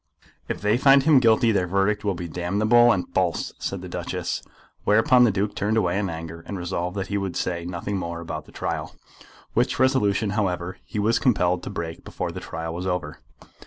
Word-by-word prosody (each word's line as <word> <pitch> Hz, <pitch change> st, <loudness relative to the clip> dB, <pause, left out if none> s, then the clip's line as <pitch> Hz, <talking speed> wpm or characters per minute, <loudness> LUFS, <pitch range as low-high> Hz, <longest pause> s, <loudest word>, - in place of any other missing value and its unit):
"If -, -, -4 dB
they 105 Hz, +3 st, +2 dB
find 135 Hz, 0 st, +6 dB
him 150 Hz, -2 st, +6 dB
guilty, 115 Hz, -1 st, +4 dB
their 95 Hz, -4 st, +1 dB
verdict 100 Hz, +3 st, +1 dB
will 100 Hz, -2 st, 0 dB
be 85 Hz, 0 st, -5 dB
damnable 105 Hz, +8 st, +3 dB
and 95 Hz, -5 st, 0 dB
false," 90 Hz, -3 st, 0 dB
said -, -, -4 dB
the -, -, -6 dB
Duchess. -, -, -3 dB, 0.4 s
Whereupon 115 Hz, +4 st, +5 dB
the 115 Hz, -, +3 dB
Duke 100 Hz, +1 st, -1 dB
turned 105 Hz, +2 st, 0 dB
away 95 Hz, -2 st, +1 dB
in 100 Hz, -2 st, -1 dB
anger, 85 Hz, 0 st, -7 dB
and 100 Hz, -, -4 dB
resolved 90 Hz, +1 st, -3 dB
that 95 Hz, -, -1 dB
he 100 Hz, 0 st, 0 dB
would 95 Hz, -3 st, -4 dB
say 85 Hz, -2 st, -2 dB
nothing 90 Hz, +3 st, -3 dB
more 85 Hz, -2 st, -4 dB
about 80 Hz, -2 st, -6 dB
the -, -, -16 dB
trial, -, -, -4 dB, 0.6 s
which -, -, +1 dB
resolution, 110 Hz, -6 st, +2 dB
however, 95 Hz, -4 st, -2 dB
he 110 Hz, -, -7 dB
was 110 Hz, +3 st, +2 dB
compelled 90 Hz, -8 st, +2 dB
to -, -, -6 dB
break 80 Hz, -1 st, -5 dB
before -, -, -4 dB
the -, -, -6 dB
trial 80 Hz, 0 st, -5 dB
was 90 Hz, +2 st, -4 dB
over. 90 Hz, -5 st, -3 dB
95 Hz, 200 wpm, -24 LUFS, 85-110 Hz, 0.6 s, find